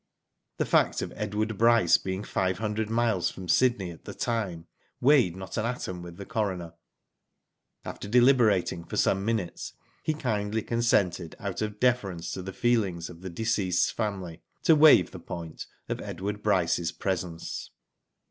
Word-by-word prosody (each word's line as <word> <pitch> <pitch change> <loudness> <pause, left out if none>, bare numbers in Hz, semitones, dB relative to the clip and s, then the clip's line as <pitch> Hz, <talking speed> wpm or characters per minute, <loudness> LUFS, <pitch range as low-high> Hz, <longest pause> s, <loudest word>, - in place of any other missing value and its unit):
The - - 0
fact - - +2
of - - -6
Edward 105 0 -2
Bryce 115 -6 +5
being 95 +1 -4
five 95 -3 -1
hundred 110 0 -2
miles 115 -5 +1
from 95 -1 -9
Sydney 110 -6 +2
at 80 - -14
the - - -7
time, 100 -9 -2 0.3
weighed 125 - +4
not 95 0 -7
an 110 - 0
atom 95 -7 -4
with 85 -1 -10
the 100 - -7
coroner. 95 -7 -2 1.1
After - - -6
deliberating 115 -8 +4
for - - -6
some 95 0 +2
minutes, 105 -5 -2 0.3
he 155 - -1
kindly 110 -5 -1
consented, 100 -8 +1
out 100 -1 -4
of 105 -1 -3
deference 100 -9 0
to 95 - -4
the 95 +1 -6
feelings 95 -7 0
of 85 0 -14
the, 95 - -6
deceased's 95 -2 +1
family, 95 -7 -4 0.2
to 160 - +6
waive 150 - +7
the 90 - -8
point" 85 -1 -7 0.2
of - - -3
Edward 105 +2 -4
Bryce's 90 -5 +1
pre 95 -1 -1
sence. 85 -1 -6
100 Hz, 155 wpm, -27 LUFS, 90-115 Hz, 1.1 s, waive